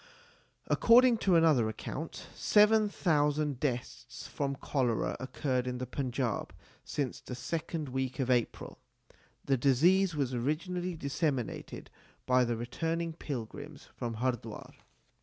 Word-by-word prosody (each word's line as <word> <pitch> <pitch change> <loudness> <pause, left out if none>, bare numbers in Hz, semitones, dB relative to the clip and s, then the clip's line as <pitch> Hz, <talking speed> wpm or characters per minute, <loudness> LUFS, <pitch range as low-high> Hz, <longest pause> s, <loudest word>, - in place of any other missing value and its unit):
According 240 +1 +5
to 190 -5 +3
another 155 -9 +4
account, 150 +8 -6
* - - -19
seven 210 0 +4
thousand 150 -6 +1
deaths 125 -4 -4
from 140 -1 -2
cholera 130 -4 -1
occurred 130 -1 -2
in 125 0 -2
the 130 - -3
Punjab 125 -3 -2 0.3
since 140 -4 -3
the 125 - -7
second 155 +2 -4
week 130 0 -2
of 130 -1 +1
April. 120 -2 -1 0.7
The 135 -1 +2
disease 165 +9 +4
was 135 -3 -1
originally 175 +8 -2
disseminated 140 -4 -3 0.3
by 125 0 +4
the 120 -1 -1
returning 165 +8 -2
pilgrims 130 -8 -7
from 115 -1 -4
Hardwar. 115 -2 -3
140 Hz, 120 wpm, -31 LUFS, 125-165 Hz, 0.7 s, According